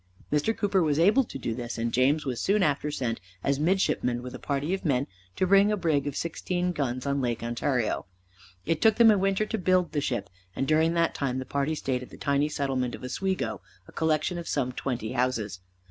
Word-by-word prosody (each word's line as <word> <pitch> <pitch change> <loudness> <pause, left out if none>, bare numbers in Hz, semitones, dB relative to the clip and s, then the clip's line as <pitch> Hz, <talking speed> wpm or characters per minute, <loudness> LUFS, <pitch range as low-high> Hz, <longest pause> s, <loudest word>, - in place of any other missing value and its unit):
Mr. 150 +10 +1
Cooper 200 -2 +2
was 150 -3 +1
able 205 +11 +5
to - - -7
do 120 -3 -3
this, 120 0 -5
and 115 0 -2
James 140 +5 +3
was 125 -4 -2
soon 200 0 +2
after 150 -2 +1
sent 125 -6 -2 0.2
as 140 0 +1
midshipman 150 -8 +1
with 125 - -7
a - - -7
party 145 +4 -1
of 195 - -3
men 140 -4 +1 0.3
to 185 - +1
build 200 +2 +5
a 210 - +1
brig 155 -6 +1
of 145 - -3
sixteen 175 +2 -2
guns 130 -5 -2
on 140 0 0
Lake 120 -2 -2
Ontario. 120 -3 -1 0.6
It 165 - 0
took 220 -1 +5
them 225 -1 +7
a 210 - +3
winter 195 +2 +1
to 225 - -3
build 185 -1 +2
the 145 - -1
ship, 120 -8 -2 0.3
and 135 - -1
during 160 +2 +3
that 170 -1 +2
time 130 -2 -2
the 130 - -4
party 140 +3 -1
stayed 130 -4 -2
at 125 - -9
the - - -12
tiny 140 +1 +1
settlement 130 -4 -1
of - - -13
Oswego, 190 +9 -2 0.3
a - - -13
collection 160 +2 0
of 170 - -7
some 125 -1 0
twenty 125 -4 -3
houses. 120 -6 -1
145 Hz, 220 wpm, -27 LUFS, 125-180 Hz, 0.6 s, them